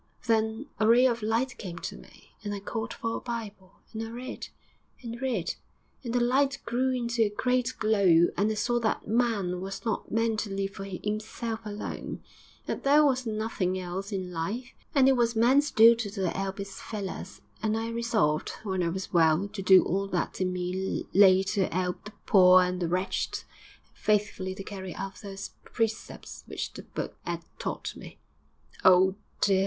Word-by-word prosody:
Then 220 +2 +1
a 215 - +3
ray 240 +3 +6
of 235 -2 +2
light 230 +4 0
came 175 -4 -6
to - - -5
me, - - -16
and 205 -1 -3
I - - -5
called 220 +2 -4
for 230 0 -3
a - - -4
Bible, 210 -5 -6 0.2
and 220 - -4
I 225 - -4
read, 250 +3 -6 0.6
and 235 +1 -6
read; 240 -10 -1 0.5
and 235 - -4
the 245 - +2
light 270 +3 +2
grew 255 +2 +1
into 235 -2 -1
a - - 0
great 250 +4 0
glow, 195 -6 +4
and 205 +3 +2
I 220 - -1
saw 240 +3 +1
that 225 -2 -1
man 210 -6 +1
was 195 +3 -6
not 225 - -2
meant 225 -1 +1
to 210 - -3
live 195 0 -2
for 195 0 -7
'imself 215 +4 -4
alone; 210 0 -5 0.4
that - - -4
there 295 +2 +6
was 265 -3 +3
something 215 -4 -1
else 185 +3 -5
in 185 -2 -3
life, 210 +10 -3 0.2
that 270 -2 +5
it 270 - +5
was 235 -1 +2
man's 265 +6 +4
duty 230 -2 +6
to 195 -3 -2
'elp 195 0 -3
his 200 -1 -7
fellers; 200 -3 -6 0.2
and 220 0 +1
I 225 +1 -2
resolved, 220 -10 0
when 190 -3 -1
I 170 - +1
was 190 +3 -5
well, 165 +3 +4
to 200 - -6
do 190 0 +7
all 195 +2 -1
that 185 0 -2
in 185 0 +1
me 180 +1 -2
lay 190 -1 +7
to 195 0 0
'elp 180 +2 -2
the 210 - -9
poor 185 -1 +7
and 180 0 -2
the 170 - +1
wretched, 185 +3 -1 0.4
and - - -34
faithfully 205 -3 0
to 195 - -7
carry 190 -2 -7
out 195 0 -6
those 195 -1 -7
precepts 225 -1 -4
which - - -4
the - - -8
Book - - -6
'ad - - -4 0.2
taught - - -4
me.' - - -11 0.7
'Oh, 185 +1 +6 0.3
dear! 195 -2 +4
210 Hz, 185 wpm, -28 LUFS, 190-230 Hz, 0.7 s, do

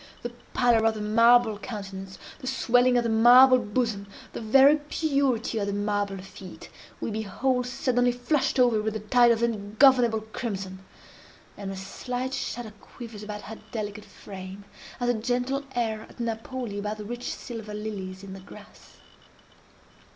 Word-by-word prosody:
The 240 - -4 0.2
pallor 240 -3 +4
of 225 - +1
the - - -5
marble 230 +1 +4
countenance, 195 -4 -7 0.2
the 255 - -8
swelling 250 -1 +3
of 240 - +2
the 230 - -1
marble 250 +3 +7
bosom, 215 -2 -2 0.3
the - - -5
very 270 +7 +6
purity 280 -6 0
of 200 - -2
the 200 - -2
marble 205 -1 -1
feet, 185 0 -11 0.3
we - - -3
behold 245 +4 -1
suddenly 245 -1 +1
flushed 250 +3 0
over 240 -4 +4
with 220 0 -2
a - - -2
tide 240 +3 +4
of 235 0 +2
ungovernable 230 +2 +3
crimson; 200 -4 -5 0.8
and 200 -1 -6
a 195 - -5
slight 250 +7 -5
shudder 240 -4 -4
quivers 230 -4 -10
about 210 0 -7
her 220 +1 -9
delicate 210 -2 -5
frame, 195 0 -10 0.3
as 245 - -1
a - - +4
gentle 250 +4 -1
air 220 -3 -2
at - - -17
Napoli 230 -1 -4
about 210 +1 -3
the 210 - -7
rich 240 +3 -5
silver 220 -3 -7
lilies 200 -3 -6
in 195 -1 -8
the 195 - -9
grass. 190 - -15
225 Hz, 160 wpm, -26 LUFS, 205-245 Hz, 0.8 s, marble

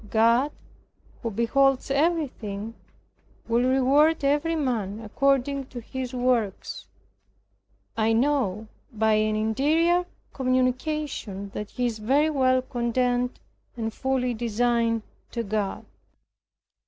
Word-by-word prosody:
God, 230 +6 +3 0.7
who 230 - -2
beholds 265 +5 +2
everything, 270 - -1 0.7
will 230 +1 +2
reward 280 +5 +3
every 295 +4 +2
man 225 -9 -1
according 275 +4 0
to 250 - -8
his 255 +2 -5
works. 240 - -1 1.1
I 220 0 +2
know 225 -5 +1 0.2
by 220 -1 +2
an 215 0 +2
interior 310 +11 +2 0.3
communication 255 -5 -1
that 210 -1 -5
he 250 - -2
is 230 -2 -2
very 280 +8 +2
well 255 -3 +2
content, 245 0 -1 0.4
and 225 -1 -3
fully 255 -1 0
resigned 230 0 0 0.3
to 235 - -2
God. 205 -2 -2
245 Hz, 105 wpm, -25 LUFS, 220-275 Hz, 1.1 s, God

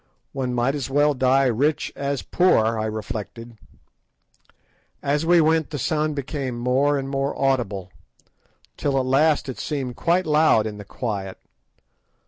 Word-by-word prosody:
One 130 -2 -3
might 125 +3 +1
as 140 -3 -4
well 145 +2 +3
die 130 +1 +3
rich 135 +5 0
as 140 -1 -3
poor, 115 -11 +2
I 110 - -1
reflected. 110 +2 -6 1.5
As 145 +3 0
we 175 0 +6
went 160 0 +2
the 150 - -4
sound 155 +2 -1
became 135 -3 -4
more 130 +4 +1
and 135 -1 -3
more 135 0 -2
audible, 115 -9 -1 0.9
till 140 -2 0
at 130 - -1
last 140 +2 +2
it 130 - -6
seemed 135 -5 -3
quite 180 +2 +1
loud 150 -8 +3
in 105 -1 -5
the 105 - -9
quiet. 100 -4 -5
135 Hz, 145 wpm, -23 LUFS, 120-145 Hz, 1.5 s, we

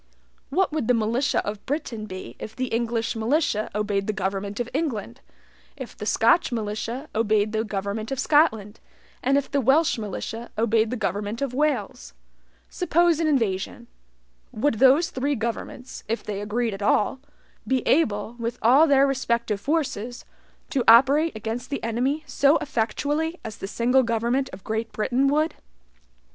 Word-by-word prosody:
What 370 +5 +1
would 300 -7 -2
the 250 - +4
militia 230 +5 0
of 205 0 -5
Britain 250 -7 -3
be 185 -1 -8
if 220 - -8
the 255 +1 -2
English 230 0 -1
militia 225 -1 0
obeyed 205 -2 -1
the 215 - 0
government 200 +1 -3
of 240 - -1
England, 265 -5 -3 0.6
if 260 -4 -8
the 210 - -6
Scotch 235 +9 +3
militia 230 +4 -3
obeyed 215 -1 +1
the 220 0 0
government 205 +2 -4
of 270 - -2
Scotland, 245 -9 +2 0.4
and 270 +2 +2
if 280 - -2
the 280 - +1
Welsh 270 +2 +3
militia 225 +3 -5
obeyed 225 0 +2
the 250 - -3
government 205 +2 -2
of 275 -3 -2
Wales? 245 - -1 0.5
Suppose 330 - +2
an 325 - +1
invasion; 230 -5 -1 0.7
would 225 0 0
those 280 +7 +5
three 280 +1 -1
governments 235 +2 -5
(if 230 +2 -2
they 205 -1 -4
agreed 220 +2 -1
at 195 - -7
all) 210 +5 +2 0.5
be 260 -2 0
able, 220 -6 +1
with 235 +1 -3
all 270 +8 +6
their 275 -1 +5
respective 235 -6 -1
forces, 255 -5 -2 0.5
to 270 -6 +1
operate 275 +7 +6
against 225 +3 -5
the 280 - -4
enemy 255 +7 -1
so 285 +1 +3
effectually 290 +7 -2
as 220 -2 -6
the 195 - -6
single 245 +5 +2
government 235 +3 0
of 185 0 -11
Great 220 +1 -3
Britain 255 +5 +1
would? 305 +3 +1
235 Hz, 155 wpm, -24 LUFS, 215-275 Hz, 0.7 s, all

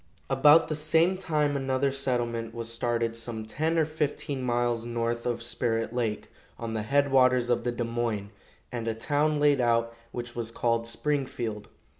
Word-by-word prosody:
About 145 +4 +6
the 155 - -2
same 160 +4 +3
time 155 -6 0
another 135 0 0
settlement 120 -4 -2
was 115 0 -3
started 115 -1 -1
some 115 -1 -5
ten 160 +9 -1
or 160 - +4
fifteen 150 -2 -2
miles 120 -2 0
north 120 0 -2
of 120 -1 -2
Spirit 115 -1 -1
lake, 115 -4 -2 0.3
on 115 -1 -4
the 110 - -1
head 140 +5 +2
waters 125 -2 +4
of 120 - +1
the 120 - +1
Des 120 0 -3
Moines, 115 -3 -2 0.4
and 115 -2 -4
a 115 - 0
town 150 +5 +1
laid 145 -2 +4
out 115 -1 +2 0.2
which 120 -1 -6
was 115 -1 -3
called 115 0 0
Springfield. 120 -5 -2
120 Hz, 170 wpm, -28 LUFS, 115-140 Hz, 0.4 s, About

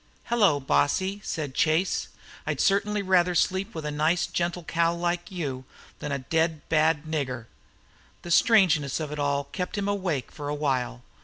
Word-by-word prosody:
"Hello, 205 -11 +4
bossy!" 165 - +1
said 145 -4 -4
Chase. 160 +6 +1 0.4
"I'd - - -1
certainly 205 +1 +2
rather 180 -2 +3
sleep 190 +2 0
with 160 -2 -5
a 150 - -2
nice, 155 +4 +1
gentle 175 0 -2
cow 170 +1 +1
like 175 +1 -2
you 145 -9 -4 0.4
than 150 - -4
a 140 - 0
dead 160 +3 -1
bad 155 -1 +3
nigger." 135 -6 -3 0.8
The 175 - -6
strangeness 165 - +4
of 155 -2 -4
it 150 - -5
all 140 0 +1
kept 180 +1 -4
him 200 0 -1
awake 185 -9 -1
for 145 -1 -6
a 145 - -1
while. 130 - -1
160 Hz, 165 wpm, -26 LUFS, 145-180 Hz, 0.8 s, Hello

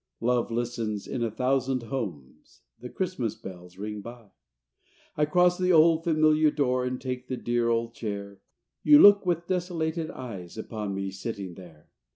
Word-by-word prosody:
Love 120 0 +1
listens 115 -3 -3
in 125 - -4
a 115 - 0
thousand 130 +2 0
homes, 85 - -7 0.2
The 125 +1 -8
Christmas 150 - -3
bells 90 -3 -11
ring 105 +1 -5
by. 115 -1 -11 0.8
I 150 - +2
cross 180 +3 +3
the 185 0 +2
old 165 0 +5
familiar 155 -1 +4
door 130 -4 0
And 125 0 -3
take 125 -1 -5
the 130 - -3
dear 120 -1 0
old 115 0 0
chair. 100 -3 -6 0.4
You 295 -1 +7
look 205 -4 +7
with 170 -1 0
desolated 170 -3 -2
eyes 100 -8 -8
Upon 105 -3 -4
me 95 0 -3
sitting 95 -1 -6
there. 85 -4 -15
120 Hz, 160 wpm, -27 LUFS, 105-155 Hz, 0.8 s, You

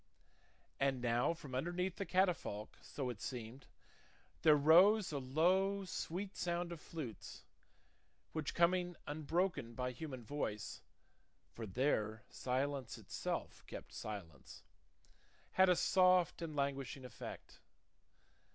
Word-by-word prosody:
And 135 -2 +2
now 120 +2 +2
from 145 -5 -10
underneath 175 +7 -1
the 195 - -3
catafalque, 175 - 0
so 130 -3 -3
it 105 - -10
seemed, 125 +1 -6 0.7
there 155 -2 +7
rose 175 +8 +6
a 145 - -1
low 185 +9 +2
sweet 190 +2 -4
sound 175 0 -1
of 165 -3 -7
flutes, 140 -10 -7 0.9
which, 155 -2 -2
coming 175 +1 +3
unbroken 155 -4 -1
by 125 +1 -1
human 130 -1 -6
voice 110 -5 -3 0.7
(for 115 -1 -6
there 110 -1 0
silence 130 -1 -2
itself - - -4
kept - - -8
silence), 85 -10 -7 0.9
had 190 0 +5
a 180 - +6
soft 185 -2 +4
and 160 -3 -4
languishing 140 -2 -2
effect. 125 - -9
145 Hz, 115 wpm, -37 LUFS, 125-175 Hz, 0.9 s, there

